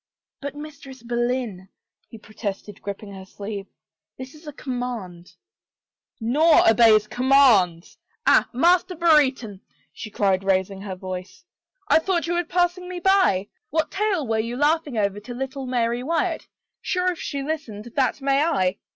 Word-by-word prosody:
" - - -65
But 285 0 -5
Mistress 280 -4 -10
Boleyn," 240 -5 -2 0.4
he 225 - -11
protested, 210 -2 -7
gripping 200 0 -7
her 190 -1 -9
sleeve, 200 +1 -7 0.3
" - - -69
this 260 +1 -9
is 305 +1 -16
a - - -5
conunand 245 - -6 0.2
— - - -70
" - - -71
" - - -52
Nor, 295 +9 +4
obeys 225 -2 +6
such 210 - -23
commands.... 245 -10 +3 0.3
Ah, - - +4
Master 350 +7 +3
Brere 310 -4 +5
ton,'^ 225 -7 -10 0.3
she. 215 - -8
cried, 195 -2 +1
raising 195 0 0
her 195 -2 -6
voice. 185 - -8 0.2
" - - -46
I - - +5
thought 345 0 -1
you 340 - -1
were 350 0 +1
passing 355 +1 -1
me 360 -1 -5
by. 360 - +3 0.2
What 320 +1 -1
tale 390 -6 0
were 225 -2 0
you 230 +2 -3
laughing 295 -2 +1
over 200 -1 0
to 240 +4 -9
little 265 +1 -5
Mary 240 -1 0
Wyatt? 325 +6 -1 0.3
Sure, 365 0 0
if 350 - -8
she 280 -1 -4
listened, 240 -8 -5
that 270 0 +1
may 275 +1 +2
I 200 - +1
250 Hz, 175 wpm, -23 LUFS, 205-310 Hz, 0.4 s, obeys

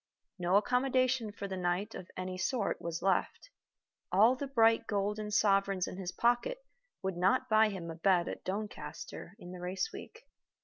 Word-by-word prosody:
No 180 +2 +2
accommodation 255 +1 +2
for 200 -1 -6
the 190 - -4
night 180 +4 -1
of 180 - -8
any 185 0 -4
sort 200 +3 -1
was 170 -1 -4
left. 195 - 0 0.6
All 215 +7 +5
the 280 +2 -4
bright 225 -3 +3
golden 210 +1 -1
sovereigns 195 -2 +2
in - - -7
his 185 -2 -4
pocket 240 - +1 0.5
would 190 -1 -1
not 190 +8 +2
buy 215 0 +5
him 175 -5 -5
a - - -7
bed 175 0 +2
at - - -6
Doncaster 200 -1 -6
in 175 - -10
the 180 - -8
race 185 - -2
week. 460 +4 -10
200 Hz, 170 wpm, -32 LUFS, 185-230 Hz, 0.6 s, All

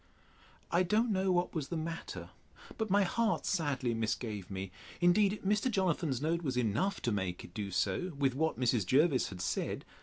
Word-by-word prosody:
I 175 - +4
don't 215 +6 +2
know 190 -1 +2
what 175 0 +1
was 150 -5 -2
the 170 - -3
matter, 165 +1 -5 0.4
but 220 -1 -2
my 200 +1 +4
heart 215 -1 0
sadly 140 -8 0
misgave 110 -3 -2
me: 95 -1 -5 0.3
Indeed, 195 +4 +4
Mr. 210 +5 +2
Jonathan's 170 - 0
note 165 +2 +1
was 135 -6 -2
enough 125 - 0
to 120 - +1
make 95 -4 -2
it 85 - -12
do 100 0 -4
so, 100 - 0
with 135 -2 +2
what 160 +2 0
Mrs. 120 -4 +2
Jervis 135 - +3
had 95 -3 -7
said. - - -2
160 Hz, 180 wpm, -33 LUFS, 115-185 Hz, 0.4 s, I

